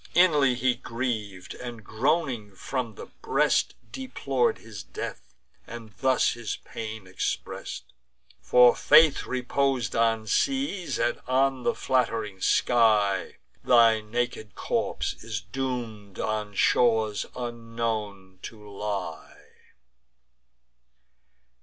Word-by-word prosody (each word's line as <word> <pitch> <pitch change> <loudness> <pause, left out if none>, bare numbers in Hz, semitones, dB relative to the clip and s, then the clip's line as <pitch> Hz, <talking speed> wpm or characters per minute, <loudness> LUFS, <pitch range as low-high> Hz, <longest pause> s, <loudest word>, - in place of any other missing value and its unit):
Inly 150 -8 +5
he 125 0 +2
griev'd, 110 -7 -4
and, 120 -3 -8
groaning 120 - -1
from 120 +1 -4
the - - -8
breast, - - 0 0.2
Deplor'd 140 - -1
his 110 -4 -10
death; 60 -7 -8 0.3
and 115 -2 -9
thus 130 -1 +3
his 120 -4 -4
pain 110 -2 -7
express'd: 90 0 -4 0.6
"For 125 -1 +6
faith 155 0 +5
repos'd 130 -1 0
on 115 -1 +2
seas, 265 - 0
and 120 0 0
on 130 0 +2
the - - 0
flatt'ring 115 -6 -1
sky, 105 -5 +3 0.3
Thy 115 -3 +5
naked 110 -1 -3
corpse - - -2
is 110 -3 -3
doom'd 110 -2 -5
on 105 -1 -3
shores 110 -3 +2
unknown 115 -5 -4
to 105 -2 -10
lie." 100 0 -5
115 Hz, 100 wpm, -26 LUFS, 105-130 Hz, 0.6 s, For